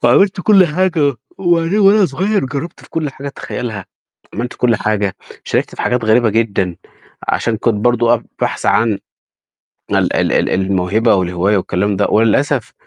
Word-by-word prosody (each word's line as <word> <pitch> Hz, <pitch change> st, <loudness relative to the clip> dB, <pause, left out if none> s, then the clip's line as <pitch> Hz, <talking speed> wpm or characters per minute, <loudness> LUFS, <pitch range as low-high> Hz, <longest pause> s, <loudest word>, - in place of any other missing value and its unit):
فعملت 185 Hz, +11 st, +3 dB
كلّ 195 Hz, -2 st, +5 dB
حاجة 155 Hz, -4 st, +1 dB, 0.2 s
وبعدين 175 Hz, +1 st, +1 dB
وأنا 200 Hz, -1 st, +5 dB
صغيّر 195 Hz, +8 st, -1 dB
جرّبت 140 Hz, +5 st, -6 dB
في -, -, -18 dB
كلّ 155 Hz, -3 st, -2 dB
حاجة 140 Hz, +1 st, -8 dB
تتخيّلها، 115 Hz, -6 st, -6 dB, 0.5 s
عملت 120 Hz, +3 st, -4 dB
كلّ 120 Hz, -3 st, +1 dB
حاجة، 100 Hz, -2 st, -1 dB, 0.3 s
شاركت -, -, -1 dB
في -, -, -5 dB
حاجات 125 Hz, -2 st, 0 dB
غريبة 110 Hz, +1 st, +3 dB
جدًا، 100 Hz, -5 st, 0 dB, 0.5 s
عشان 115 Hz, -1 st, 0 dB
كنت 115 Hz, 0 st, 0 dB
برضه 120 Hz, +2 st, +2 dB
أبحث 115 Hz, -, -4 dB
عن 110 Hz, -3 st, +2 dB, 0.9 s
ال -, -, +1 dB
ال -, -, +1 dB
ال -, -, +1 dB
الموهبة 95 Hz, +4 st, +1 dB
والهواية 95 Hz, +2 st, +1 dB
والكلام 95 Hz, +2 st, -1 dB
ده، 100 Hz, -, +1 dB
وللأسف 115 Hz, +4 st, +1 dB
120 Hz, 150 wpm, -16 LUFS, 105-155 Hz, 0.9 s, كلّ